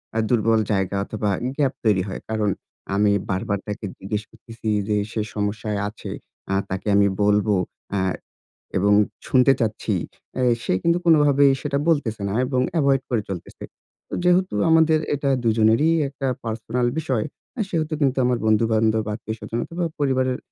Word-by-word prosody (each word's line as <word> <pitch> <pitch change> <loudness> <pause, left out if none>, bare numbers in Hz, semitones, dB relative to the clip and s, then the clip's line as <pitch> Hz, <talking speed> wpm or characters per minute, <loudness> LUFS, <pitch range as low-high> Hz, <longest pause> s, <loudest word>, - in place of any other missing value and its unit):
আ - - 0
দুর্বল 115 -1 +3
জায়গা 95 -1 0
অথবা, 105 -1 -2 0.3
গ্যাপ 140 -3 +2
তৈরি 100 -5 +3
হয়। 95 - -6
কারণ 110 -2 0 0.5
আমি 105 0 +3 0.2
বারবার 95 +1 -1
তাকে 105 +1 -4
জিজ্ঞেস 105 +2 -3
করতেছি 115 0 -11 0.2
যে 105 - +2 0.2
সে 110 - -1
সমস্যায় 105 0 -2
আছে, 110 - -8 0.4
আ - - +2 0.2
তাকে 95 +2 -4
আমি 100 0 +5 0.2
বলবো। 105 0 +3 0.4
অ্যাঁ 95 -2 0 0.6
এবং 100 +2 +3 0.3
শুনতে 130 +1 +5
চাচ্ছি। 110 -1 -1 0.5
এ - - +1 0.2
সে - - -1
কিন্তু 170 +1 +3
কোনভাবেই 145 -4 +5
সেটা 140 -1 -1
বলতেছে 125 -10 +1
না 100 - -3
এবং 130 -1 0 0.2
এভয়েড 140 -3 +3
করে 115 -3 +1
চলতেছে। 95 -3 -7 0.4
তো - - -5
যেহেতু 180 - +3 0.2
আমাদের 160 -1 +5 0.2
এটা 140 -1 0
দুজনেরই 115 +7 +4 0.2
একটা 135 0 -5 0.2
পার্সোনাল 115 +2 -1
বিষয়। 130 -8 0 0.3
আ - - -1
সেহেতু 160 -3 -2
কিন্তু 135 -3 +2
আমার 125 -1 +2
বন্ধু-বান্ধব, 110 0 +2
আত্মীয় 110 0 -6
স্বজনতা 115 +2 -4
অথবা, 170 +1 -3 0.2
পরিবারের 130 -2 +1
115 Hz, 155 wpm, -23 LUFS, 105-135 Hz, 0.6 s, আমি